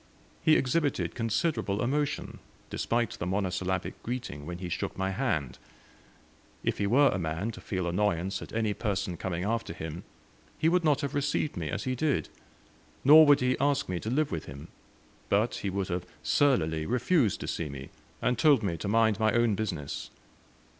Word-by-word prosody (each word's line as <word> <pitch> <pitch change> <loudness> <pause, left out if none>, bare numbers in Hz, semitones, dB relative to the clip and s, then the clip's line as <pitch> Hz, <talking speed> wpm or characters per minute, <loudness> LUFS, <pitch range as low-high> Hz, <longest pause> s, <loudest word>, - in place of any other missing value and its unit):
He 155 - +5
exhibited 145 +2 +1
considerable 115 -3 0
emotion, 145 +3 -1 0.3
despite 120 -3 0
the 85 - -5
monosyllabic 95 -1 -2
greeting, 115 - -5
when 85 0 -5
he 90 0 -5
shook 85 - -3
my 95 0 -1
hand. 95 - -1 1.0
If - - -1
he 100 - +1
were 135 +6 +5
a 95 - -1
man 85 +6 -2
to - - -11
feel 95 -3 -3
annoyance 95 +1 0
at - - -9
any 110 -2 0
person 100 -3 -2
coming 90 0 -3
after 115 -2 -1
him, 80 +2 -6 0.5
he 160 - +3
would 180 +1 +2
not 150 -2 +3
have 140 -2 -3
received 145 +1 0
me 80 -3 -3
as 100 - -3
he 130 - -1
did, 140 +2 0 0.7
nor 155 +2 +9
would 145 -2 +6
he 125 0 +2
ask 140 +1 +1
me 90 -1 -1
to 110 - -4
live 150 +4 +1
with 80 - -3
him, 70 +4 -10 0.6
but 105 +4 +2
he 100 - -3
would 95 0 -2
have 90 0 -3 0.2
surlily 95 - +2
refused 125 - +2
to - - -4
see 80 -3 -3
me, 70 -1 -8 0.3
and 125 -2 +1
told 145 -7 +5
me 85 -5 -1
to 90 - -5
mind 110 0 +3
my 110 -1 +3
own 120 -2 +3
business. 90 -9 -4
105 Hz, 180 wpm, -29 LUFS, 90-130 Hz, 1.0 s, nor